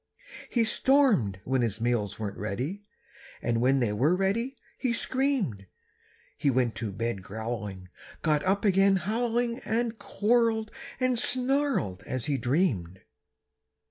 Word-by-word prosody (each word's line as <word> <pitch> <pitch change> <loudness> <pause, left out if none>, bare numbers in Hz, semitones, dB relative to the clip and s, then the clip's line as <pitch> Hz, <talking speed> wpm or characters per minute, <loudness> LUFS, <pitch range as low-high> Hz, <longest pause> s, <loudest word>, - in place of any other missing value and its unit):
He 235 - +2
stormed 220 - +3
when 130 +1 +1
his 115 -2 -1
meals 115 -4 0
weren't 105 -2 -4
ready, 125 - -3 0.6
And 115 -1 0
when 135 +2 +3
they 110 -4 +1
were 140 +11 +3
ready, 230 +8 -1 0.2
he 250 -3 0
screamed. 230 - -1 0.7
He 145 -1 +1
went 125 -3 +2
to 110 -2 -3
bed 115 0 -3
growling, 105 -2 -5 0.4
got 155 -2 +2
up 195 +2 +1
again 195 0 +5
howling 235 +5 0
And 230 -2 -2
quarreled 220 +1 +1 0.3
and 255 -2 +2
snarled 255 - +1
as 130 -2 -3
he 145 -3 0
dreamed. 115 - 0
155 Hz, 130 wpm, -28 LUFS, -, 0.7 s, again